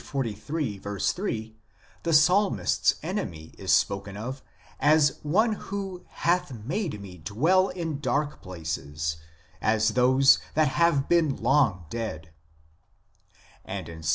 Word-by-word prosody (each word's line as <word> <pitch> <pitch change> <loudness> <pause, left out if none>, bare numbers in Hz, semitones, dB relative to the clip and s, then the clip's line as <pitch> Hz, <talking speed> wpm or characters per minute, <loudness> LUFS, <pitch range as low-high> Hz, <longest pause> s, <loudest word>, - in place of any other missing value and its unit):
3 130 -6 -2 1.7
the 165 - -1
psalmist 160 - +3
s - - +5
enemy 80 -1 -4
is - - -1
spoken 100 0 +1
of 130 +5 -5 0.4
as 150 -1 +4
one 215 +10 +2
who 195 -3 -6
" - - -33 0.2
hath 175 -2 +2
made 160 - -2
me 95 -3 -10
dwell 160 - +2
in 165 -5 -4
dark 145 +1 -1
places, 80 -3 -4 0.4
as 110 0 +2
those 130 +4 +5 0.2
that 155 -2 +4
have 145 -1 +2
been 165 -5 +3
long 115 - +2
dead," 85 -9 -5 1.4
andinPs. 80 -2 -5
135 Hz, 115 wpm, -26 LUFS, -, 1.7 s, s